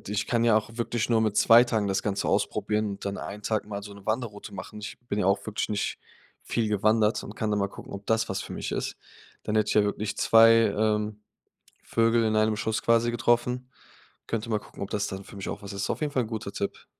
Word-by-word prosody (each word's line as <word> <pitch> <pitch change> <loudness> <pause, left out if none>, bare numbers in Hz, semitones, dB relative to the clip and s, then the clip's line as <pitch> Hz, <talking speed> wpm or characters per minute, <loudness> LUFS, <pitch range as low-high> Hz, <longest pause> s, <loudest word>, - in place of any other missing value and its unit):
ich 105 - -1
kann 115 -1 +1
ja 115 -2 +5
auch 110 +1 -1
wirklich 120 -1 -1
nur 115 -1 +4
mit 110 -2 0
2 115 +1 +8
Tagen 110 -4 0
das 95 - 0
Ganze 100 -1 -1
ausprobieren 105 0 0
und 100 - -8
dann 100 0 -3
einen 105 +1 -7
Tag 110 0 -1
mal 100 -1 -5
so 105 0 -9
'ne 100 -1 -14
Wanderroute 110 -2 -3
machen. 100 +3 -8
Ich 105 - -7
bin 100 - -1
ja 90 - +1
auch 100 +1 +1
wirklich 110 -1 -2
nicht 105 -1 -2 0.4
viel 115 -2 -1
gewandert 105 +1 +2
und 105 - -9
kann 110 - -1
dann 105 -1 +1
mal 100 - 0
gucken, - - -11
ob 100 0 -7
das 115 0 +1
was 100 0 -2
für - - -8
mich - - -4
ist. - - -3 0.5
Dann 105 - -2
hätte 105 -1 +2
ich - - 0
ja 105 - +5
wirklich 105 +1 -2
2, 115 0 +7 0.2
ähm, 105 0 0 0.6
Vögel 115 0 +2
in 110 -1 +1
einem 110 0 +2
Schuss 110 +1 -1
quasi 115 0 +3
getroffen. 120 +2 +1 0.6
Könnte 115 0 -3
mal 110 - +2
gucken, - - -11
ob 100 - -4
das 105 -1 -1
dann 95 0 -6
für - - -12
mich 100 - -5
auch - - -5
was 100 - -7
ist. 100 0 -2
Auf - - -2
jeden 150 -1 -1
Fall 130 - +1
'n - - -8
guter 110 -3 -4
Tipp. 100 - -4
110 Hz, 245 wpm, -27 LUFS, 100-115 Hz, 0.6 s, 2